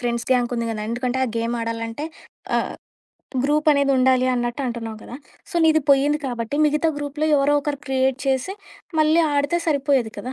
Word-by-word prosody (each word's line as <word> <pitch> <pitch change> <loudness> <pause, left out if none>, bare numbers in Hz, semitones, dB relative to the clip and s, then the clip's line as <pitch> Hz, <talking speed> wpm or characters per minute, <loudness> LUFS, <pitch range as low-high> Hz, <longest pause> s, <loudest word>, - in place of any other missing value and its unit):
Friends 235 -1 -2
gang 245 -1 +2
ఉంది 230 0 -1
కదా, 220 -1 -4
ఎందుకంటే, 245 +2 -2
ఆ - - -1
గేమ్ 230 +1 -1
ఆడాలంటే, 230 +3 -4 0.5
ఆహ్, - - -2 0.7
గ్రూప్ 300 +2 +2
అనేది 280 -1 +2
ఉండాలి 255 0 +3
అన్నట్టంటున్నావు 240 -2 -3
కదా! 245 - -8 0.3
సో, - - -12
నీది 315 -1 +4
పోయింది 285 +2 +3
కాబట్టి 240 +1 -3
మిగతా 300 +2 +1
గ్రూప్‌లో 295 +2 -2
ఎవరో 285 +1 +3
ఒకరు 285 -1 -3
క్రియేట్ 265 0 +1
చేసి 270 +8 0 0.5
మళ్ళీ 310 +2 +4
ఆడితే 285 +4 +1
సరిపోయేది 275 -6 +1
కదా. 255 - -5
265 Hz, 165 wpm, -22 LUFS, 240-290 Hz, 0.7 s, నీది